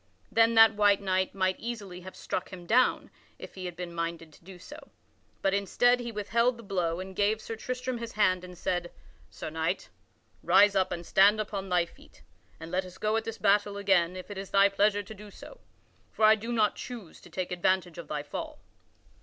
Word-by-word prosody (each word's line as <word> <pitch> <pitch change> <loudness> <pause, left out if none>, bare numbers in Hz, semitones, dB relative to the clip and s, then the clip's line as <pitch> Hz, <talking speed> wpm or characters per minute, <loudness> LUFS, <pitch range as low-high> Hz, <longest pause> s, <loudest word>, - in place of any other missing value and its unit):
Then 230 0 +4
that 225 -1 +8
white 205 -1 +4
knight 190 -1 -1
might 185 -1 0
easily 205 -6 -6
have 185 +1 -10
struck 185 - -4
him 180 -2 -10
down 245 +7 +2 0.3
if - - -10
he 185 -1 -7
had 175 -1 -5
been 175 0 -6
minded 165 -1 -4
to - - -20
do 185 +1 -12
so. 290 - -12 0.5
But, 195 - +2
instead, 245 +5 +2
he 235 -1 -5
withheld 235 +3 +1
the 230 - -11
blow 180 -4 -1
and 190 0 -7
gave 210 +2 +1
Sir 225 - -6
Tristram 250 +1 -4
his 230 -1 -6
hand 185 -4 +2
and 180 -1 -10
said: 175 -1 -2 0.4
"Sir - - -7
Knight, - - -2 0.5
rise 205 0 +5
up 190 -1 +2
and 170 0 -5
stand 200 +5 +5
upon 200 -2 -4
thy 175 -1 +2
feet - - -20 0.4
and 165 +1 -9
let 185 +1 0
us 185 0 -12
go 215 +1 0
at 225 - -1
this 225 0 -5
battle 205 0 +2
again 190 -3 +2
if 185 +2 -8
it 195 - -6
is 195 - -7
thy 200 0 +5
pleasure 205 +1 +2
to 210 - -10
do 210 0 -12
so; - - -13 0.5
for 220 - +2
I 215 - +8
do 220 +2 -4
not 220 -3 +2
choose 230 -9 -9
to - - -15
take 185 -1 -4
advantage 180 -1 0
of 170 - -8
thy 150 -1 -3
fall." 145 - -6
195 Hz, 210 wpm, -29 LUFS, 180-220 Hz, 0.5 s, that